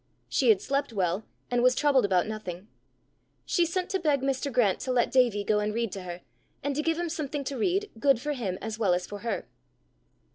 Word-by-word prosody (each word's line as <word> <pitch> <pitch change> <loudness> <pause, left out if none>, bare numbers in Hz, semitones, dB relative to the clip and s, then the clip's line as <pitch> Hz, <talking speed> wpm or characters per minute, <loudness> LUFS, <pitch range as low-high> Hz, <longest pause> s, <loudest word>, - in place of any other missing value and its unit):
She 255 - +2
had 210 -4 +5
slept 275 -1 -1
well, 190 -1 -1 0.3
and 245 0 +2
was 255 +1 +5
troubled 275 -6 +3
about 185 -3 +2
nothing. 205 -3 -6 0.8
She 345 -2 +2
sent 360 +2 -1
to 385 - +1
beg 295 -5 +2
Mr. 275 +1 -1
Grant 220 -7 +2
to 260 - -3
let 245 -2 +2
Davie 240 -6 +3
go 210 +1 +2
and 210 +1 -1
read 230 -3 -1
to 195 - -5
her, 175 -1 -7 0.4
and 280 0 -1
to 300 - +1
give 325 +1 0
him 345 0 -1
something 295 -3 -3
to 275 +1 -4
read, 380 - 0
good 275 -1 +4
for 295 +4 -2
him 200 -9 -3
as 220 0 -4
well 190 -5 +3
as 180 0 -2
for 205 - -7
her. 230 +3 -3
245 Hz, 220 wpm, -28 LUFS, 205-285 Hz, 0.8 s, had